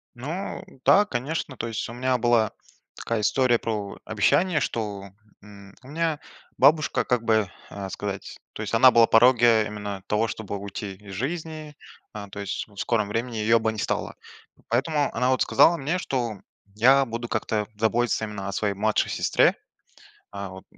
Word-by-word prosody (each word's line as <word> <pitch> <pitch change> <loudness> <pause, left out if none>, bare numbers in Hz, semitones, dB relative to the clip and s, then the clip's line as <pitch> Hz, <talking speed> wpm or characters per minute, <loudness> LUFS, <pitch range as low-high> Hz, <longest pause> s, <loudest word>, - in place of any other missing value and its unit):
Ну 155 +10 -5 0.2
да, 205 +1 +6
конечно, 140 -3 -3
то 115 - -4
есть 110 - -4
у 115 - -7
меня 125 +1 0
была 115 -2 +2 0.4
такая 115 -2 -3
история 125 +2 +2
про 105 -3 -4
обещание, 150 - +2
что, 100 -3 -4 0.3
м, 100 -1 -14
у 130 - -15
меня 160 +1 -1 0.4
бабушка, 150 +3 +3
как 125 -2 0
бы, 110 -4 +2 0.2
э, 100 -1 -6
сказать, 100 0 -6
то - - -7
есть - - -4
она 130 +3 +7
была 115 -2 +6
на - - +4
пороге 115 -2 +5
именно 105 -2 -6
того, 105 +2 +1
чтобы 105 -2 -5
уйти 100 0 -6
из 100 0 -13
жизни, 155 - -5 0.4
э, 105 -1 -6
то 100 - -6
есть 100 -1 -4
в 100 -2 -22
скором 105 +1 0
времени 115 +3 -3
её 110 +1 +3
бы 110 0 0
не 110 - -9
стало. - - -2 0.5
Поэтому 145 +5 0
она 125 +2 +1
вот 130 - +2
сказала 170 - +5
мне, 155 +6 -2
что 120 - -3 0.3
я 130 +6 +5
буду 115 0 -5
как-то 110 -1 -1
заботиться 110 +1 +1
именно 100 -2 -6
о - - -4
своей 100 0 -1
младшей 105 +2 0
сестре, - - +3 0.8
э, 100 0 -5
вот 95 +1 -11
115 Hz, 175 wpm, -25 LUFS, 105-130 Hz, 0.8 s, она